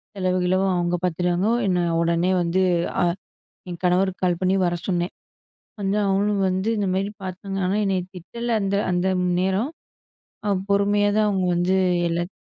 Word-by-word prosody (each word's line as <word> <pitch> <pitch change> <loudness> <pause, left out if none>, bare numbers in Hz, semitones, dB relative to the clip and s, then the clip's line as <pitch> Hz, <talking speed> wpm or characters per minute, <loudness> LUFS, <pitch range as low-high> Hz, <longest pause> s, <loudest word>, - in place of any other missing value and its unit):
செலவு, 185 -1 0
கிளவு, 185 +1 +2
அவங்க 175 0 0
பார்த்துட்டாங்க. 180 +2 0 0.2
என்னை 180 -2 +1 0.2
உடனே 170 +2 +1
வந்து, 175 +2 +1 0.4
அ - - +3 0.7
என் 175 -1 -6
கணவருக்கு 185 +1 +1
கால் 175 -2 +2
பண்ணி 185 +1 +2
வர 175 - +1
சொன்னேன். 175 -1 -1 0.7
வந்து 195 +1 0
அவங்களும் 200 +1 +1
வந்து 190 +4 -1
இந்த 205 -2 0
மாதிரி 195 +2 -1
பார்த்தாங்க. 190 +1 -5
ஆனா 190 +2 0
என்னைய 190 -2 +1
திட்டல 235 +7 -6
அந்த 195 0 0 0.2
அந்த 180 +1 +1 0.3
நேரம் 190 +7 0 0.8
அ - - +1 0.2
பொறுமையா 205 +1 +3
தான் 215 0 +3
அவங்க 190 -2 0
வந்து 175 +2 +1 0.3
எல்லாத் 170 +1 -2
185 Hz, 155 wpm, -23 LUFS, 180-195 Hz, 0.8 s, அ